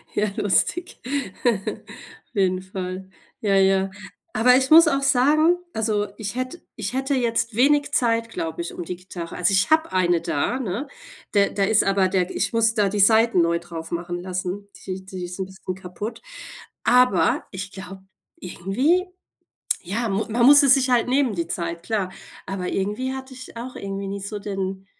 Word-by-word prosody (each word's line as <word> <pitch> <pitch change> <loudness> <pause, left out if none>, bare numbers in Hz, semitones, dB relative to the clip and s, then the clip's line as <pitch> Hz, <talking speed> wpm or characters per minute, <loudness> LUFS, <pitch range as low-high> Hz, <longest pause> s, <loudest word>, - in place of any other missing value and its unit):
Ja, 210 - +2
lustig. 205 - 0 0.5
Auf 215 -5 -4
jeden 185 -2 +1
Fall. 185 0 -6 0.3
Ja, 200 -2 +2
ja. 195 0 +3 0.5
Aber, 250 +3 +5
ich 265 +2 0
muss 330 +1 +9
auch 275 -2 +1
sagen, 295 +6 +4 0.2
also, 215 -3 0
ich 210 +1 -5
hätt 255 +7 -4
ich 210 -1 -4
hätte 270 +2 -1
jetzt 230 -2 0
wenig 285 +4 +3
Zeit, 230 -2 +1
glaube 165 -6 -4
ich, 170 - -6
um - - -5
die 180 +2 -5
Gitarre 175 -2 -8
also 180 +2 +2
ich 195 0 +3
habe 315 +1 +3
eine 175 -2 +2
da, 195 - -1
ne? 235 +3 -3 0.5
Da 200 -1 +4
da 200 - -1
ist 210 +1 +4
aber 195 -1 +2
der 185 -1 0
ich - - 0
muss 225 -1 +3
da 210 -3 +2
die 205 +1 -2
Saiten 220 -1 +5
neu 170 0 +1
drauf 165 -1 -8
machen 175 +1 -3
lassen, 185 +2 -4 0.2
die 190 0 -5
die 190 -2 -7
ist 180 +2 -8
'n 190 - -1
bisschen 190 -1 -7
kaputt, 190 +4 -7 0.6
aber 245 -9 +3
ich 190 0 -6
glaube, 190 0 -10 0.4
irgendwie 250 - 0 0.8
ja, 210 +6 -2
mu 205 +1 -1
man 235 +2 +3
muss 285 +2 +9
es 270 -2 +7
sich 265 -2 +1
halt 245 -1 +3
nehmen, 260 -3 +2
die 170 -2 -3
Zeit, 170 0 -4
klar. 200 -4 -2 0.3
Aber, 185 -2 -4
irgendwie 210 +7 -2
hatte 265 0 -8
ich 255 -2 -11
auch 245 +2 -7
irgendwie 195 0 -5
nicht 200 0 -5
so 210 -1 -5
den 195 -1 -4
200 Hz, 180 wpm, -23 LUFS, 185-245 Hz, 0.8 s, muss